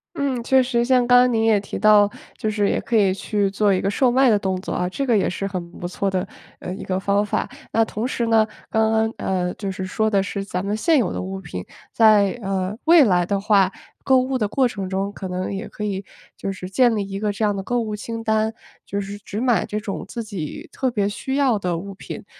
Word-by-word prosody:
嗯， 265 -4 -1
确 265 +2 +4
实 245 -2 +1
像 250 -1 +3
刚 245 0 +7
刚 250 0 +3
您 225 -1 +1
也 220 -2 +4
提 195 - -6
到 210 -1 +5 0.3
就 215 - -2
是 205 -1 +1
也 - - 0
可 235 - -1
以 195 -3 +4
去 200 +1 0
做 200 +1 +2
一 185 - +1
个 195 - -1
售 245 +5 +2
卖 260 +2 +4
的 220 - +5
动 190 -2 -2
作 - - -5
啊， 180 0 -1
这 275 +9 -3
个 235 - +3
也 200 - +1
是 195 +2 -3
很 180 -3 -5
不 175 - -4
错 195 +2 -2
的， 190 0 -1 0.3
呃， 180 - -6
一 - - -8
个 185 0 -1
方 200 +1 +1
法。 210 - -2 0.2
那 225 - +4
同 220 +2 -3
时 235 -2 -1
呢， 225 -1 +4 0.2
刚 220 0 +2
刚， 220 0 +1
呃， 180 -2 -1
就 200 -2 -4
是 190 0 -4
说 220 +3 0
的 200 -2 +3
是 195 0 -3
咱 185 -1 -4
们 205 +1 0
现 320 +7 +3
有 225 -8 0
的 - - -3
物 190 +1 -5
品， 160 - -7 0.3
在， 215 -2 +5
呃， 190 0 -2
未 330 -2 +8
来 180 -6 +3
的 200 +2 -1
话， 200 -2 +3 0.3
购 265 -1 +4
物 260 +1 -1
的 215 -5 0
过 260 +5 +2
程 195 -5 -4
中， 195 +1 -2
可 195 -2 -6
能 185 +2 -3
也 200 +4 -5
可 210 - -6
以 200 -1 -3 0.3
就 195 - -4
是 185 -1 -6
建 230 +4 +3
立 200 -2 -2
一 195 0 -5
个 210 -1 0
这 210 +2 -2
样 205 -1 +2
的 195 - -3
购 245 +5 -1
物 215 -2 -3
清 225 +2 -6
单， 220 0 +1 0.3
就 200 - -3
是 200 +1 -6
只 205 +1 -6
买 245 -2 +2
这 210 - -3
种 205 -2 -5
自 230 +2 -5
己 185 -8 -6
特 260 -1 -1
别 205 -4 0
需 265 +6 -3
要 270 -6 +3
的 180 -4 -2
物 195 +3 -7
品， 190 - -8
205 Hz, 275 characters per minute, -22 LUFS, 195-230 Hz, 0.3 s, 未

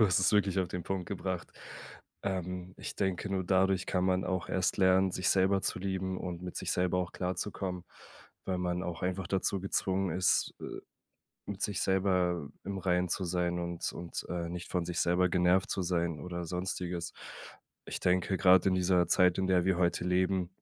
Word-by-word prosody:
Du 110 - +7
hast 90 -1 +3
es 95 - +3
wirklich 100 -2 +3
auf 90 -2 +1
den 90 -1 -4
Punkt 95 -1 -3
gebracht. 95 -2 -4 0.7
Ähm, 90 -1 -3
ich - - -6
denke, 95 0 -1
nur 95 -1 -1
dadurch 95 0 +2
kann 90 -1 0
man 95 0 +2
auch 95 -2 -2
erst 95 -1 +1
lernen, 95 0 +4
sich 90 - 0
selber 95 +1 +3
zu - - -1
lieben 95 0 -2
und 90 -1 -5
mit 90 - -6
sich - - -1
selber 90 0 +1
auch 90 -1 -2
klarzukommen, 90 -1 -3 0.6
weil 95 -1 -1
man 90 0 -1
auch 85 -2 -5
einfach 90 0 -1
dazu 95 +1 0
gezwungen 95 0 0
ist, 90 0 +2
äh, - - -7 0.8
mit 100 0 -6
sich 100 -3 -1
selber 90 -5 +1
im 100 0 -4
Reinen 90 -1 +1
zu 95 - -1
sein 90 0 0
und 85 -1 -3
und, 85 -1 -6
äh, 85 -1 -3
nicht 90 0 -6
von 90 -2 -1
sich 90 0 -2
selber 90 +1 +3
genervt 90 +1 +3
zu 95 - -1
sein 85 -3 -1
oder 85 +2 -5
Sonstiges. 90 -1 -3 0.7
Ich - - -4
denke 90 +1 +2
grad 90 -1 +6
in 95 - +3
dieser 90 -1 +3
Zeit, 90 0 +4
in 95 - 0
der 90 -2 +3
wir 95 -2 +2
heute 85 -1 +1
leben 90 0 +1
90 Hz, 190 wpm, -31 LUFS, 90-95 Hz, 0.8 s, Du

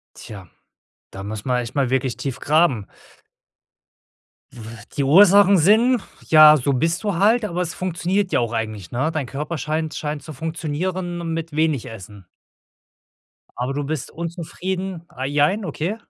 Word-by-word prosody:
Tja, 100 -3 -10 0.7
da 95 - -8
muss 105 +1 -6
man 125 -1 0
echt 115 - -8
mal 135 -4 0
wirklich 130 -1 0
tief 135 -3 -5
graben. 150 - +2 1.7
W 120 - -12 0.3
die 140 - +1
Ursachen 195 +5 +6
sind, 220 +8 +4 0.3
ja, 155 -1 +8
so 140 0 0
bist 165 - 0
du 205 -4 -1
halt, 215 +6 +3
aber 180 -4 -3
es 170 -2 -2
funktioniert 185 +2 -1
ja - - +3
auch 120 -1 -2
eigentlich, 110 -5 -4
ne? 130 +7 0
Dein 155 -4 -2
Körper 150 +6 -5
scheint 155 +2 -3
scheint 150 -1 -4
zu 155 - -9
funktionieren 165 +3 -4
mit 165 0 -5
wenig 155 -5 +1
Essen. 105 -4 -11 1.3
Aber 125 +2 -2
du 145 +1 -2
bist 150 -2 -4
unzufrieden 175 +2 -5
ah, 130 -5 -7
jein, 150 +9 +1
okay? 170 +4 -3
155 Hz, 155 wpm, -21 LUFS, 130-175 Hz, 1.7 s, ja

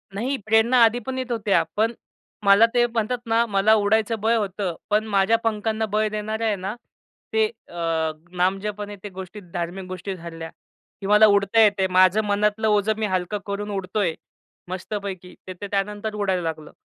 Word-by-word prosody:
नाही, 260 +7 -1
प्रेरणा 225 +3 +4
आधी 230 +2 +4
पण 265 0 -4
येत 255 -1 -4
होत्या. 205 -7 +2
पण 225 +2 +1 0.5
मला 200 +2 +7
ते 240 -1 +4
म्हणतात 230 +1 -1
ना, 230 +1 +3
मला 205 0 +3
उडायचं 220 +1 +2
बळ 225 +2 +3
होतं. 195 -4 -2
पण 210 +1 +2
माझ्या 205 +2 +3
पंखांना 220 0 0
बळ 215 0 +2
देणाऱ्या 215 +1 -2
आहे 210 - +1
ना, 195 +3 -5 0.6
ते 445 0 +4 0.2
अ, 165 -2 -1 0.3
नामजपाने 205 +3 -1
त्या 200 0 -10
गोष्टी 190 +2 -8
धार्मिक 175 +2 -4
गोष्टी 185 +1 -5
झाल्या, 165 -2 -8 0.5
की 195 - -4
मला 210 +1 +7
उडता 200 +1 +3
येते 205 -2 +4
आहे. 190 - +3
माझं 185 +3 +5
मनातलं 210 +2 +1
ओझं 210 0 +2
मी 220 - -1
हलकं 185 +2 -1
करून 205 +1 -4
उडतो 195 +1 -3
आहे 170 -5 +1 0.5
मस्तपैकी. 185 -1 -5
ते 185 - -5
ते 205 - -4
त्यानंतर 210 +2 -2
उडायला 195 -3 0
लागलं. 160 -2 -5
205 Hz, 175 wpm, -23 LUFS, 190-220 Hz, 0.6 s, मला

